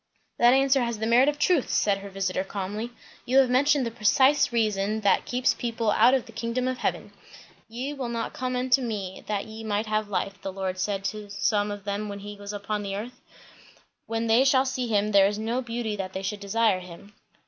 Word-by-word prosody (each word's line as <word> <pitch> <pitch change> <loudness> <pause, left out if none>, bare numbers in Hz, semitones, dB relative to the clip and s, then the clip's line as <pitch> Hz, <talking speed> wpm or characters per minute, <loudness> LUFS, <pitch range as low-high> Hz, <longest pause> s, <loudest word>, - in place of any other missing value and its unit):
"That 240 +2 +6
answer 270 0 +3
has 235 -2 -2
the 220 - -2
merit 245 +5 +5
of 295 - -3
truth," 330 -4 +2
said 200 -1 +1
her 200 0 -9
visiter 190 -1 -2
calmly. 205 +4 -4 0.3
"You 255 +2 +1
have 265 -2 +5
mentioned 280 +1 +3
the 230 - -3
precise 260 +6 +3
reason 215 -2 0
that 200 -2 +2
keeps 250 +1 +1
people 230 -3 -1
out 255 +5 +5
of 260 - -1
the - - -13
kingdom 230 +3 -2
of 255 0 -2
heaven. - - -2 0.6
'Ye 255 +6 -4
will 265 -4 -4
not 230 -1 -3
come 255 0 -3
unto 255 +1 +2
me, 205 -6 -4
that 205 -2 -2
ye 220 0 -9
might 210 0 -1
have 215 -1 -1
life,' 200 0 -3
the 195 - -4
Lord 190 -1 -4
said 195 +1 -1
to 210 +1 -4
some 205 0 0
of 205 -1 -6
them 205 +1 -3
when 200 0 -7
he 205 +1 -8
was 200 0 -8
upon 205 0 -3
earth. 215 +6 -6 0.9
'When 225 0 -2
they 230 +3 +4
shall 265 -1 +4
see 255 -2 -2
him, 210 -1 +1
there 195 -1 +6
is 205 +1 -2
no 230 +4 -1
beauty 230 -3 -3
that 190 -1 -5
they 190 - -4
should 205 +2 -3
desire 200 0 +1
him.'" 180 +3 -12
220 Hz, 215 wpm, -26 LUFS, 200-250 Hz, 0.9 s, That